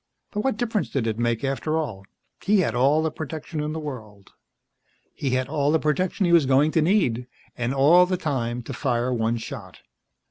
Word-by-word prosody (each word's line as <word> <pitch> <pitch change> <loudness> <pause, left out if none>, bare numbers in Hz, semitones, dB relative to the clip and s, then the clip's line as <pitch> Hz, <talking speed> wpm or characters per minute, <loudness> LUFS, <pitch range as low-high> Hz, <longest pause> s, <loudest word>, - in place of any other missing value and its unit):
But 210 - -2
what 265 -5 0
difference 225 -3 -1
did 130 -5 -1
it 110 0 -2
make, 120 +1 0
after 140 +3 -1
all? 110 -12 -4 0.4
He 200 -1 +3
had 115 -10 0
all 140 +6 +3
the 160 - 0
protection 155 +1 -6
in 150 0 -2
the 160 - -4
world. 110 -10 -9 0.8
He 140 - -3
had 130 0 0
all 145 0 +1
the 160 - +4
protection 175 +6 0
he 170 - +2
was 160 -6 +5
going 140 +4 +4
to 160 - +2
need. 150 - +1 0.3
And 120 0 -2
all 155 +7 +5
the 185 0 0
time 125 -7 -2
to - - -7
fire 125 -2 0
one 115 0 0
shot. 110 - -9
145 Hz, 200 wpm, -24 LUFS, 120-160 Hz, 0.8 s, was